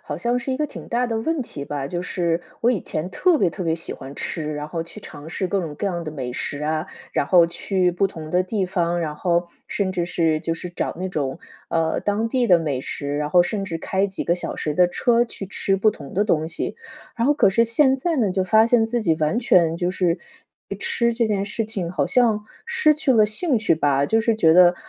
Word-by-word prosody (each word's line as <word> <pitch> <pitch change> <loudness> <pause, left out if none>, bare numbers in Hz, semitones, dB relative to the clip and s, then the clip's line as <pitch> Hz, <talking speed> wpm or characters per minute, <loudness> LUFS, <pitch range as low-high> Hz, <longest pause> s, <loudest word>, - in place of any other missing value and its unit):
好 - - -5
像 240 +1 0
是 250 +2 -4
一 - - -1
个 300 +2 -1
挺 - - -10
大 245 +1 0
的 225 -2 -2
问 310 +5 -1
题 140 - -8
吧， 140 -2 -3
就 175 +5 -3
是 170 -2 -1 0.2
我 235 - +4
以 225 -7 0
前 160 +3 -4
特 360 - +3
别 190 - +2
特 190 - -6
别 165 -2 +1
喜 165 - -4
欢 135 +1 -9
吃， 155 0 -3
然 150 0 -4
后 165 +2 -4
去 170 +5 -12
尝 150 -5 -10
试 185 +4 -2
各 195 +2 0
种 160 -4 -5
各 205 - -3
样 175 -3 -2
的 155 - -5
美 130 -5 -5
食 145 +3 -3
啊， 155 +2 -1 0.3
然 140 - 0
后 175 0 +6
去 180 +1 0
不 185 +3 +2
同 160 -5 -9
的 180 +2 +2
地 190 +1 -1
方， 175 -2 0
然 155 -3 -3
后 175 +2 0 0.2
甚 195 -2 -1
至 175 -2 -1
是 165 -3 +1
就 165 - -2
是 175 +2 -7
找 175 - -3
那 185 - -2
种， 140 -4 -2 0.3
呃， 165 -1 0
当 205 +2 0
地 245 +1 +1
的 180 -5 +6
美 145 -6 -2
食， 145 +2 -4
然 150 - -1
后 175 +3 +5
甚 200 +3 -3
至 165 -3 -3
开 190 +4 0
几 190 - -5
个 170 - +2
小 175 - -4
时 150 - -2
的 180 +3 +4
车， 235 +6 +2
去 230 -4 -6
吃 195 0 0
不 215 +3 +3
同 140 -8 -11
的 205 +3 +2
东 160 -6 +1
西。 160 - -3 0.4
然 235 0 0
后 290 - +4
可 285 - +4
是 230 +4 +3
现 265 +4 +4
在 330 +4 -1
呢， 220 -7 +2
就 190 +1 0
发 220 +4 +4
现 230 -1 +3
自 235 0 -1
己 165 -5 +2
完 155 +10 +1
全 170 -8 +3
就 175 +1 -1
是 180 -2 0 0.5
对 - - -5
吃 235 0 +1
这 230 0 +1
件 200 -2 0
事 210 +3 -3
情， 195 -6 -3
好 150 -6 0
像 225 -4 +2 0.2
失 470 -10 +3
去 290 -3 +1
了 215 -3 +5
兴 245 +5 +2
趣 215 -6 +2
吧。 145 -3 +1
就 225 +7 +2
是 230 0 +2
觉 165 -7 +4
得： 180 0 +7
180 Hz, 270 characters per minute, -22 LUFS, 165-225 Hz, 0.5 s, 得